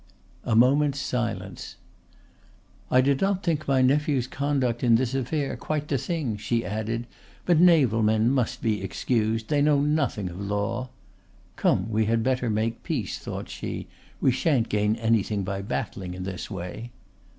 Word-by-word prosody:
A 115 - 0
moment's 140 +4 +4
silence. 115 -8 -3 1.1
"I 130 - +5
did 135 +1 +1
not 195 -1 +1
think 155 -3 -1
my 135 -2 +3
nephew's 140 -1 +2
conduct 135 -3 -1
in 120 -2 +5
this 125 +1 0
affair 135 +2 -1
quite 150 -1 -3
the 140 -3 0
thing," 145 - -2
she 115 +1 -1
added; 110 +4 -3 0.4
"but 175 -3 +4
naval 150 -11 +5
men 110 +2 +3
must 130 -4 -1
be 110 -3 0
excused; 110 +3 -1
they 145 -1 +2
know 145 -1 +4
nothing 145 -9 0
of 90 +3 -8
law." 105 +5 -2 0.7
("Come, 95 +2 +1
we 110 0 +2
had 115 +1 +1
better 125 -1 0
make 110 +2 -1
peace," 130 - -3
thought - - -6
she; - - -5 0.3
"we 130 - +3
sha'n't 130 -3 +1
gain 105 +1 +1
anything 110 -3 +1
by 100 0 -3
battling 95 -3 -4
in 90 - -6
this 95 -1 -5
way.") 95 +4 -6
120 Hz, 160 wpm, -26 LUFS, 110-140 Hz, 1.1 s, I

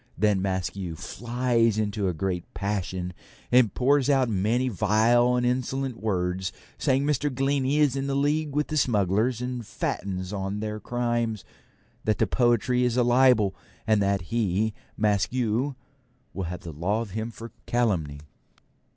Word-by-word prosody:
Then 100 0 +2
Maskew 95 -2 -2
flies 115 +4 0
into 105 -2 -1
a 90 - 0
great 90 +1 -3
passion, 95 -3 -3 0.4
and 120 -4 +5
pours 140 +3 +2
out 135 -3 +3
many 110 +5 +1
vile 115 +3 +3
and 125 0 +1
insolent 130 0 -1
words, 95 -3 -1 0.3
saying 135 +1 +2
Mr. 145 0 +1
Glennie 135 +1 +1
is 145 -3 +3
in 135 0 -2
league 150 0 0
with 150 0 0
the 155 - -1
smugglers 110 0 +1
and 125 -1 -3
fattens 95 -2 -3
on 100 +1 -3
their 105 0 -4
crimes; 120 -3 -2 0.6
that 110 -1 +1
the - - +3
poetry 125 0 +2
is 125 -1 +1
a 125 - +4
libel; 120 -5 +4 0.3
and 110 -1 +3
that 100 -1 +1
he, 110 -1 +1 0.2
Maskew, 115 +5 +1 0.6
will 95 - -3
have 90 +1 -5
the 85 - -8
law 95 +9 -1
of 110 -4 -6
him 110 +3 -3
for 115 0 -10 0.2
calumny. 90 -12 0
110 Hz, 150 wpm, -26 LUFS, 100-125 Hz, 0.6 s, and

